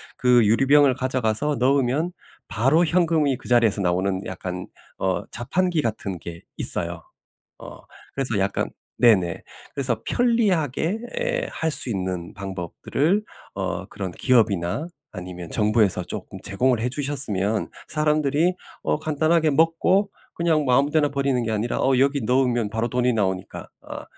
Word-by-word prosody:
그 125 Hz, -2 st, +4 dB
유리병을 135 Hz, +5 st, +4 dB
가져가서 130 Hz, +2 st, -1 dB
넣으면 140 Hz, +6 st, +1 dB, 0.3 s
바로 135 Hz, -, +2 dB
현금이 160 Hz, -5 st, +2 dB
그 130 Hz, -, -12 dB
자리에서 115 Hz, -4 st, +3 dB
나오는 95 Hz, +1 st, 0 dB
약간 90 Hz, -1 st, -5 dB, 0.3 s
어 95 Hz, -1 st, -1 dB
자판기 170 Hz, +8 st, 0 dB
같은 105 Hz, -6 st, -3 dB
게 85 Hz, 0 st, -9 dB
있어요. 85 Hz, 0 st, 0 dB, 0.6 s
어 -, -, -11 dB, 0.4 s
그래서 130 Hz, -6 st, -1 dB
약간 95 Hz, +1 st, -1 dB, 0.4 s
네네. 95 Hz, -7 st, +3 dB, 0.3 s
그래서 125 Hz, -5 st, -1 dB
편리하게 205 Hz, -, +1 dB, 0.2 s
예 -, -, -1 dB
할 160 Hz, -, -1 dB
수 145 Hz, -, +5 dB
있는 90 Hz, -4 st, -4 dB
방법들을 100 Hz, -, -2 dB, 0.3 s
어 -, -, -3 dB
그런 95 Hz, -2 st, -6 dB
기업이나 110 Hz, -, +1 dB, 0.2 s
아니면 90 Hz, -2 st, -8 dB
정부에서 105 Hz, -4 st, +2 dB
쪼끔 -, -, -7 dB
제공을 120 Hz, +4 st, +1 dB
해주셨으면 120 Hz, -6 st, 0 dB, 0.2 s
사람들이 150 Hz, +2 st, +1 dB, 0.3 s
어 -, -, 0 dB
간단하게 155 Hz, +1 st, +1 dB
먹고 165 Hz, +6 st, +2 dB, 0.2 s
그냥 165 Hz, -3 st, +1 dB
뭐 125 Hz, -2 st, +2 dB
아무 140 Hz, +1 st, +2 dB
데나 150 Hz, -1 st, +2 dB
버리는 140 Hz, -2 st, 0 dB
게 110 Hz, -, -2 dB
아니라 110 Hz, +3 st, -1 dB
어 135 Hz, -1 st, +2 dB
여기 140 Hz, +1 st, +2 dB
넣으면 125 Hz, -3 st, +1 dB
바로 115 Hz, +2 st, -1 dB
돈이 125 Hz, +1 st, +1 dB
나오니까 95 Hz, -4 st, -3 dB
어 -, -, -8 dB
125 Hz, 310 characters per minute, -23 LUFS, 100-150 Hz, 0.6 s, 수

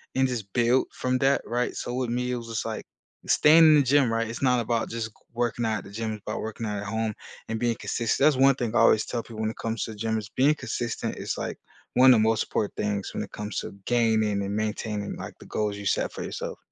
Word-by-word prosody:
and 130 Hz, 0 st, +3 dB
just 110 Hz, -6 st, -4 dB
build 120 Hz, +2 st, +3 dB
from 130 Hz, 0 st, -1 dB
that, 135 Hz, +1 st, +3 dB
right? 120 Hz, +1 st, -1 dB
So, 120 Hz, -, -4 dB
with 125 Hz, -1 st, -1 dB
me, 125 Hz, +1 st, -1 dB
it -, -, 0 dB
was 115 Hz, -, -8 dB
just 115 Hz, -1 st, -3 dB
like 110 Hz, -1 st, -5 dB, 0.4 s
staying 160 Hz, +2 st, +6 dB
in 155 Hz, -1 st, +8 dB
the 145 Hz, -, +5 dB
gym, 135 Hz, -2 st, +3 dB
right? 115 Hz, 0 st, 0 dB
It's 115 Hz, -, -6 dB
not 125 Hz, -2 st, +3 dB
about 115 Hz, 0 st, -1 dB
just 115 Hz, -1 st, -3 dB
g -, -, -27 dB, 0.2 s
working 120 Hz, 0 st, -1 dB
out 110 Hz, -1 st, 0 dB
at -, -, -11 dB
the 100 Hz, -, -12 dB
gym, 110 Hz, +1 st, -3 dB
it's 105 Hz, -, -8 dB
about 105 Hz, -, -3 dB
working 110 Hz, +1 st, -5 dB
out 105 Hz, -1 st, -2 dB
at 105 Hz, -, -6 dB
home 110 Hz, +1 st, -1 dB, 0.3 s
and 115 Hz, 0 st, -3 dB
being 120 Hz, 0 st, +1 dB
consistent, 115 Hz, +5 st, 0 dB
that's 150 Hz, -2 st, +5 dB
one 135 Hz, 0 st, +6 dB
thing 120 Hz, -4 st, -3 dB
I -, -, +3 dB
always 110 Hz, -, +5 dB
tell 120 Hz, -, -3 dB
people 110 Hz, -1 st, -8 dB
when 110 Hz, 0 st, 0 dB
it -, -, -14 dB
comes 115 Hz, 0 st, -2 dB
to 110 Hz, -, -5 dB
gym 110 Hz, +1 st, -1 dB
is 105 Hz, -2 st, -5 dB
being 140 Hz, +7 st, +3 dB
consistent 120 Hz, -5 st, -3 dB
is, -, -, -4 dB
like, -, -, -4 dB, 0.3 s
one 130 Hz, +1 st, +7 dB
of 115 Hz, -, +4 dB
the -, -, +3 dB
most 115 Hz, -, +1 dB
important 105 Hz, -, -2 dB
things 100 Hz, -1 st, -2 dB
when -, -, -3 dB
it -, -, -10 dB
comes 105 Hz, 0 st, -5 dB
to -, -, -6 dB
gaining 110 Hz, -4 st, +2 dB
and 100 Hz, +1 st, -3 dB
maintaining, 105 Hz, -1 st, -2 dB
like, -, -, -8 dB
the -, -, -13 dB
goals 105 Hz, -1 st, -2 dB
you 100 Hz, -, -8 dB
set -, -, +1 dB
for -, -, -6 dB
yourself. -, -, -5 dB
115 Hz, 265 wpm, -26 LUFS, 110-125 Hz, 0.4 s, in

